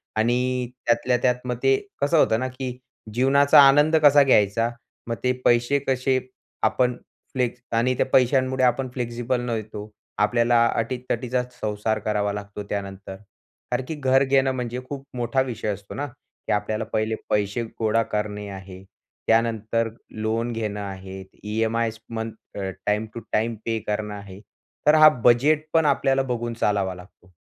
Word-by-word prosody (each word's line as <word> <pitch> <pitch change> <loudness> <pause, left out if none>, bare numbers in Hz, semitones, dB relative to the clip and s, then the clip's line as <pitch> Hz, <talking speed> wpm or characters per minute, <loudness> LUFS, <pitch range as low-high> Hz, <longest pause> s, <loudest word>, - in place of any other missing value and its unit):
आणि 125 +2 0 0.2
त्यातल्या 120 +1 +2
त्यात 125 -1 +3
मग 125 -1 -2
ते, 135 0 +5 0.3
कसं 145 +3 +3
होतं 110 -5 +4
ना, 130 - -1
की 130 -1 -6 0.4
जीवनाचा 140 +4 +5
आनंद 145 +3 +6
कसा 145 0 +7
घ्यायचा? 115 -2 +3 0.4
मग 115 - -2
ते 125 - +3
पैसे 120 +4 +3
कसे 130 0 +1 0.4
आपण 125 -1 +2 0.4
फ्लेक्स 125 -1 -1 0.2
आणि 125 +2 +2
त्या - - +2
पैशांमुळे 130 0 +3
आपण 130 +2 +1
फ्लेक्सिबल 120 0 -2
नव्हतो 110 -2 -5 0.3
आपल्याला 115 +2 +3
अटी-तटीचाच 125 +1 -2
संसार 105 +1 -1
करावा 105 -1 -1
लागतो 105 0 -6
त्यानंतर. 100 -1 -5 0.6
कारण 125 +1 0
की 160 - -4
घर 135 -1 +3
घेणं, 135 0 +3
म्हणजे 125 -1 -3
खूप 140 -1 -6
मोठा 120 +2 +1
विषय 120 -4 -4
असतो 100 +1 -10
ना, 145 - -2
की 135 +1 -11
आपल्याला 105 +2 -1
पहिले 110 +1 0
पैसे 105 +3 0 0.2
गोळा 115 +1 +2
करणे 105 -1 -3
आहे, 95 -1 -10 0.4
त्यानंतर 115 0 +1 0.2
लोन 110 +2 -2
घेणं 105 -2 -3
आहे, 95 -1 -7 0.2
EMIs 110 +1 -1
month 115 -1 -4 0.3
a, 95 -1 -2 0.2
time 105 +1 +1
to 115 - -5
time 115 +1 0
पे 115 -1 -1
करणं 105 0 -2
आहे. 100 -1 -10 0.5
तर 150 - +7
हा 155 0 +9
बजेटपण 155 +6 +3
आपल्याला 135 -1 +2
बघून 120 -2 -3
चालावा 95 -3 +1
लागतो. 90 0 -17
115 Hz, 150 wpm, -24 LUFS, 105-130 Hz, 0.6 s, हा